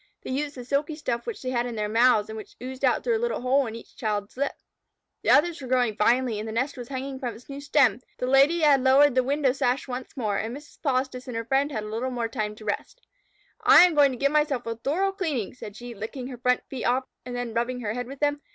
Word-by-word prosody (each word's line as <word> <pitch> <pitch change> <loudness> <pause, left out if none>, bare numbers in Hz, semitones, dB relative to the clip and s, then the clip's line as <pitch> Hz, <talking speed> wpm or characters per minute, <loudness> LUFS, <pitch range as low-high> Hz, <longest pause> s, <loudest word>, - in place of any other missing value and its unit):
They - - -5
used 285 +2 -2
the 250 -2 -8
silky 285 +4 -1
stuff 245 -6 -3
which 440 - -5
they 255 - -2
had 240 -1 0
in 240 - -5
their 210 -1 -1
mouths, 225 -1 +4
and 220 - -7
which 215 - -9
oozed 260 +1 -7
out - - +2
through 470 -2 +2
a - - -5
little 475 - -1
hole 260 +1 +2
in 225 - -6
each 230 - -12
child's 210 -4 -3
lip. 280 +2 -1 0.7
The - - -1
others 335 +1 +4
were 260 - -6
growing 245 -4 +2
finely, 235 0 +2
the 220 +1 -5
nest 255 +6 -1
was 245 -3 -8
hanging 265 0 -5
from 245 -4 -4
its 235 - -15
new 280 0 -7
stem, 265 -6 +3 0.2
the - - -2
Lady 275 +6 +4
had 290 -3 +5
lowered 270 +1 +6
the 255 - +4
window 275 0 +2
sash 255 0 0
once 255 +1 -6
more, 210 -5 0
and 230 +4 -3
Mrs. 290 0 -16
Polistes 260 -2 -1
and 245 -2 -4
her 230 - -3
friend 270 +4 +1
had 215 -6 -3
a - - -6
little 230 +4 -3 0.2
time 210 -1 -3
to 215 - -13
rest. 210 - -4 0.6
"I - - +9
am 355 - +1
going 290 -2 +5
to 255 - -5
give 280 +3 +2
myself 295 -5 +1
a 230 0 -3
thorough 320 - 0
cleaning," 310 - -2
said 210 -5 -9
she, 240 +1 -8
licking 225 +5 -6
her 250 - -7
front 250 0 +2
feet 260 -3 -6
off 255 +2 +1 0.2
and 245 0 -6
then 245 -2 -4
rubbing 245 +2 -1
her 210 -2 -2
head 245 +1 -4
with 275 +2 -10
them. 290 0 +1
255 Hz, 260 wpm, -26 LUFS, 235-280 Hz, 0.7 s, I